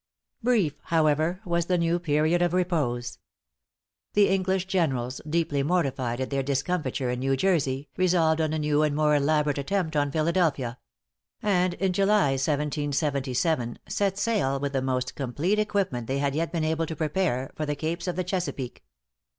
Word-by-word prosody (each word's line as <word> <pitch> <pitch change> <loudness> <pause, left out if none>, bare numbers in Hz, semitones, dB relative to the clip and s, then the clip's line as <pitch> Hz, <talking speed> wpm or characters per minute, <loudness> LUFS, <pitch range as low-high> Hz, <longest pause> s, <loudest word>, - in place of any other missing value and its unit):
Brief, 220 - +1
however, 160 +2 +1
was 170 -1 0
the 180 - +2
new 170 0 +1
period 160 +1 +2
of 175 -1 +2
repose. 145 -10 -1 0.9
The 205 -1 +4
English 190 -1 +1
generals, 135 -10 -1
deeply 160 -3 +1
mortified 135 -7 0
at 130 - -3
their 135 0 +1
discomfiture 135 -2 -1
in 125 - -3
New 135 +1 +1
Jersey, 140 -5 +1
resolved 170 -3 +3
on 155 -1 0
a 155 - -1
new 150 -1 +1
and 150 -1 +1
more 150 0 +3
elaborate 145 0 +2
attempt 160 +2 -1
on 145 -1 +2
Philadelphia; 155 -6 0 0.6
and 180 -4 +2
in 190 -1 0
July, 195 -5 +3
1777, 140 -2 0
set 200 -1 0
sail 200 -12 +1
with 140 0 -3
the 135 - +1
most 130 -1 -1
complete 145 +10 -1
equipment 195 - -1
they 135 - -1
had 140 0 0
yet 165 +3 -1
been 165 -3 -1
able 160 +1 0
to 160 - -4
prepare, 150 -4 -1
for 155 - -3
the 150 - -1
capes 165 +5 -3
of 180 - -1
the 185 - -1
Chesapeake. 175 - -4
155 Hz, 165 wpm, -26 LUFS, 140-180 Hz, 0.9 s, The